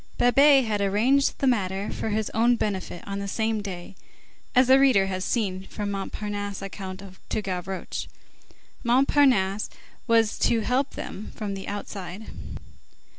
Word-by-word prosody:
Babet 275 +2 +6
had 210 -2 -1
arranged 230 +8 +2
the - - -1
matter 195 -5 0
for - - -3
his 215 0 -1
own 235 +2 +3
benefit, 190 -5 -3
on 200 0 -3
the 200 - -4
same 220 +1 -1
day, 190 -1 -7 0.6
as 255 +1 +6
the 260 +2 +6
reader 260 -8 +5
has 185 -1 -3
seen 190 -4 -1
from 205 -1 -4
Montparnasse's 205 0 -4
account 195 -1 -7 0.3
to - - -1
Gavroche. 190 0 -4 0.8
Montparnasse 245 -5 +3 0.4
was 225 -2 +3
to 230 - +3
help 255 +5 0
them 210 - -7
from 205 -2 -4
outside. 200 0 -6
210 Hz, 135 wpm, -26 LUFS, 195-240 Hz, 0.8 s, Babet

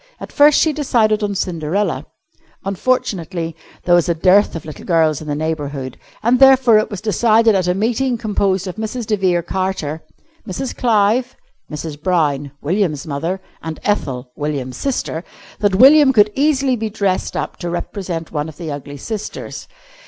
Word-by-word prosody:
At - - -9
first 290 0 +5
she 315 - +2
decided 225 -7 +1
on 205 -1 -1
Cinderella. 180 +2 -2 0.6
Unfortunately 185 -6 -1 0.3
there 175 - +2
was 175 0 +4
a 170 - +2
dearth 185 +5 +4
of 165 - -6
little 155 - -9
girls 160 -4 +2
in 155 - -9
the 145 - -1
neighbourhood, 145 -4 -3 0.3
and 240 +3 +3
therefore 265 -4 +6
it 215 - -2
was 200 -4 -6
decided 225 +1 +3
at 185 -3 +1
a 180 - +1
meeting 240 +5 0
composed 200 -4 0
of 185 +1 -6
Mrs. 220 +2 -4
de 210 - +1
Vere 180 -3 +1
Carter, 175 -4 -3 0.5
Mrs. 255 +7 -4
Clive, 235 +1 +2 0.4
Mrs. 150 -1 -6
Brown 150 -6 0
(William's 160 -3 0
mother), 165 +6 -3 0.2
and 160 -1 -6
Ethel 130 -11 -2
(William's 140 -4 -4
sister), 245 -11 -2 0.4
that 205 -2 +2
William 270 +5 +7
could 210 -2 +5
easily 275 -2 +2
be 220 -2 -3
dressed 200 -3 -1
up - - -4
to 175 - -4
represent 175 -1 -4
one 150 0 -3
of 150 - -13
the 165 -3 -5
ugly 145 0 -7
sisters. 210 +8 -6
190 Hz, 165 wpm, -18 LUFS, 160-220 Hz, 0.6 s, William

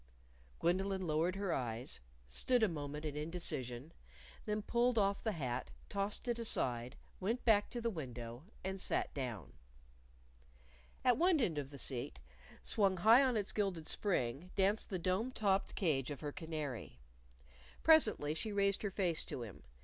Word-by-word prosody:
Gwendolyn 190 +2 +1
lowered 165 +3 +1
her 195 -3 -1
eyes, 120 -2 -2 0.3
stood 240 - +2
a - - +6
moment 150 -2 -5
in 150 -2 -3
indecision, 150 -4 -3 0.5
then 210 0 -1
pulled 240 +2 +2
off 200 -1 +2
the 220 - 0
hat, 125 - -3 0.2
tossed 200 +5 -2
it 240 -1 0
aside, 125 - 0 0.2
went 225 +6 -1
back 210 -3 +5
to 240 - -3
the 230 0 0
window, 125 - -6 0.2
and 190 0 -3
sat - - 0
down. 120 - -5 1.5
At 250 -2 +5
one 350 -2 +4
end 170 - +1
of 140 -2 -5
the 140 - -10
seat, 120 - +1 0.5
swung 195 -3 +2
high 225 +8 +7
on 255 -4 +3
its 205 -2 0
gilded 195 -6 -1
spring, 160 - -1
danced 200 +2 +2
the 190 - -1
dome 185 +8 0
topped 200 -5 +1
cage 150 - +1
of 145 - -6
her 145 -1 -3
canary. 155 - -5 0.9
Presently 220 - +5
she 215 +7 -3
raised 200 -1 +2
her 205 - -1
face 180 -4 +1
to 125 - -4
him. 105 -6 -9
180 Hz, 155 wpm, -36 LUFS, 140-210 Hz, 1.5 s, high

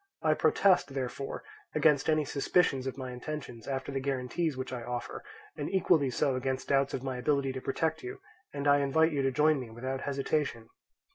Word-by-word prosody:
I - - +4
protest, 185 -8 +3
therefore, 135 +1 -4 0.3
against 150 -1 +4
any 155 -1 +3
suspicions 140 -2 +1
of 130 - -4
my 130 -2 -5
intentions 125 -2 -6
after 135 0 -3
the 135 - -1
guarantees 135 +3 -1
which 130 0 -4
I 125 - -4
offer, 120 +1 -5 0.3
and - - -3
equally 175 -7 +3
so 130 +1 +1
against 130 +1 -2
doubts 135 0 +2
of 130 - -5
my 130 -2 -3
ability 140 +1 +1
to 130 - -5
protect 160 +4 -1
you, 380 +2 -6 0.3
and 140 0 -3
I 145 0 +6
invite 160 +4 +3
you 145 -2 0
to 135 0 +1
join 150 +2 +3
me 125 -3 -7
without 130 +4 -4
hesitation. 140 -4 -1
135 Hz, 190 wpm, -30 LUFS, 130-150 Hz, 0.3 s, I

